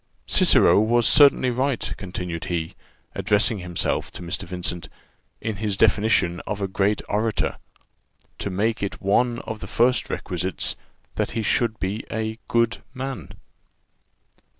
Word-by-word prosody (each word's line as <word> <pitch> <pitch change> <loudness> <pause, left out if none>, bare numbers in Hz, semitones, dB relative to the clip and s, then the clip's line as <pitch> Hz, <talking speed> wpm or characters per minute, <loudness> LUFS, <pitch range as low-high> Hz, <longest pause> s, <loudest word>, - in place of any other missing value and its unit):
Cicero - - +5
was 115 +2 +3
certainly 140 -3 +5
right," 130 0 -1
continued 90 -4 -5
he, 85 -2 -3 0.4
addressing 105 +1 +2
himself 90 -1 -1
to - - -8
Mr. 85 +3 -3
Vincent, 90 -3 -4 0.5
"in 110 -3 -3
his 105 -1 -2
definition 100 -5 +3
of 105 -1 -3
a 100 - -1
great 100 +2 0
orator, 110 +1 -1 0.8
to - - -2
make 110 +4 0
it 100 - -3
one 120 +5 +2
of 110 -1 -5
the 100 - -7
first 120 +5 +2
requisites, 90 +1 -2 0.4
that - - 0
he 110 - 0
should 115 0 +1
be 100 +4 -2
a 110 0 -3
good 115 -1 +1 0.2
man." 130 - -5
105 Hz, 135 wpm, -24 LUFS, 95-115 Hz, 0.8 s, Cicero